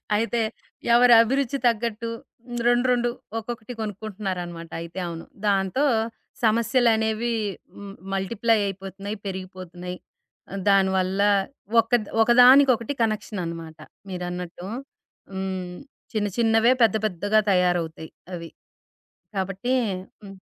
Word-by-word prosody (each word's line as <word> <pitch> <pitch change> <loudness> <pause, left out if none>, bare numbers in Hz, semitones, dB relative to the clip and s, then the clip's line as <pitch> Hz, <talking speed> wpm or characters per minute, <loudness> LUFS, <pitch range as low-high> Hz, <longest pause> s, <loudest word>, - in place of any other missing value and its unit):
అయితే, 230 +2 0 0.5
ఎవరభిరుచి 245 +3 +5
తగ్గట్టు 230 0 -1 0.6
రెండు, 245 +1 +3
రెండు, 240 -1 +2 0.3
ఒక్కొక్కటి 230 +1 -7
కొనుక్కుంటన్నారనమాట 185 -5 -5
అయితే. 170 +3 -7
అవును. 165 -1 -7 0.2
దాంతో 195 +7 +2 0.6
సమస్యలనేవి 225 0 +2 0.4
హ్మ్, 200 -1 -9 0.2
మల్టిప్లై 220 +4 +1
అయిపోతున్నాయి, 195 +2 -6
పెరిగిపోతున్నాయి. 185 -1 -7 0.7
దాని 195 -1 +5
వల్లా 190 +2 +2 0.5
ఒక్కద్ 230 -1 +2 0.2
ఒక 240 - +2
దానికొకటి 255 -1 +6
కనెక్షననమాట 170 -7 -3 0.3
మీరన్నట్టు. 180 0 -5 0.7
హ్మ్. 190 -2 -4 0.4
చిన్న 210 -2 0
చిన్నవే 225 +1 +4
పెద్ద 225 -1 +4
పెద్దగా 205 +2 +1
తయారవుతయి 175 -3 0 0.2
అవి. 165 -1 -7 0.9
కాబట్టి 195 +6 -1 0.5
హ్మ్. 195 -1 -10
205 Hz, 90 wpm, -24 LUFS, 185-230 Hz, 0.9 s, దానికొకటి